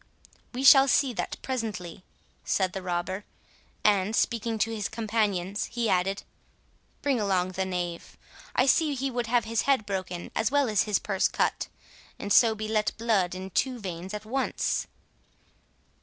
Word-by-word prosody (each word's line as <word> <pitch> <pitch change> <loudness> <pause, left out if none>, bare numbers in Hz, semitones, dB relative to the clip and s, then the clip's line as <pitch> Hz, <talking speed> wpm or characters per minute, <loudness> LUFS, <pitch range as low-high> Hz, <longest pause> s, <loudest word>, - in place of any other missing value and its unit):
"We 255 +2 -4
shall 270 0 +8
see 265 -1 +3
that - - -3
presently," 210 -9 -4 0.4
said 185 -2 0
the 190 - -4
robber; 185 +2 -3 0.6
and, 205 0 +3
speaking 230 -1 0
to 225 +1 0
his 210 -2 -3
companions, 210 -4 -1
he 235 -2 -2
added, 190 +2 0 0.8
"bring 275 -4 +1
along 185 -3 +1
the 190 +1 -2
knave. 175 -2 -4 0.4
I 255 - +4
see 295 +1 +3
he 270 +1 -2
would 245 -1 -2
have 240 0 +2
his 225 -1 0
head 265 -6 +3
broken, 185 -3 -4
as 220 - +1
well 285 -1 +2
as 210 -2 +2
his 210 -3 +2
purse 195 -2 0
cut, - - -1 0.5
and 205 0 -1
so 225 -2 +6
be 215 0 -4
let 215 -1 0
blood 210 -6 +1
in 190 +1 -7
two 255 +4 0
veins 185 0 -6
at 210 - -7
once." 260 +4 -1
210 Hz, 160 wpm, -27 LUFS, 190-235 Hz, 0.8 s, shall